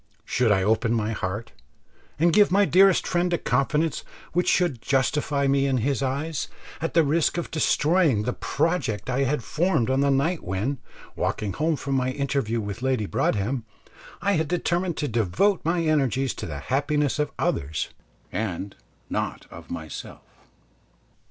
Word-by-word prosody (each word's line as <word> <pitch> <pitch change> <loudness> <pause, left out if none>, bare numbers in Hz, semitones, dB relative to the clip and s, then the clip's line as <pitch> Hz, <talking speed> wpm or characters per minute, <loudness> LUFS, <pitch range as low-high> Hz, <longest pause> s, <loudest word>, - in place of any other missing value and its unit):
Should 125 -3 +2
I 95 -2 +3
open 115 +3 +2
my 110 -1 0
heart 105 +1 -4 0.7
and 170 +2 +3
give 210 0 +6
my 200 +2 +5
dearest 190 0 +5
friend 175 0 0
a - - +3
confidence 150 +4 0 0.3
which 180 +1 +2
should 170 -10 +1
justify 140 +1 +1
me 140 0 +2
in 135 -1 +1
his 130 +1 0
eyes, 140 +3 -2 0.3
at 165 - -3
the 165 - +6
risk 155 +3 +1
of 170 - -3
destroying 155 - +2
the 125 +3 -1
project 145 - -1
I 135 +2 +1
had 135 -1 -1
formed 155 -7 +1
on 135 +1 +2
that 140 - +3
night 145 +6 +1
when, 105 +9 -2 0.4
walking 100 -3 -2
home 160 +1 +1
from 140 -1 -4
my 130 -1 +1
interview 135 -5 -1
with 100 +1 -5
Lady 130 -4 0
Broadhem, 110 +5 0 0.6
I 200 - +2
had 160 -5 +1
determined 175 0 -1
to 150 - -1
devote 120 - +1
my 170 +1 +1
energies 135 -4 +1
to - - -6
the 75 -3 -5
happiness 145 - 0
of 150 - +1
others 75 +2 -1 0.4
and 100 -1 -3 0.3
not - - -3
of - - -11
myself? 80 -3 -7
140 Hz, 160 wpm, -25 LUFS, 115-165 Hz, 0.7 s, give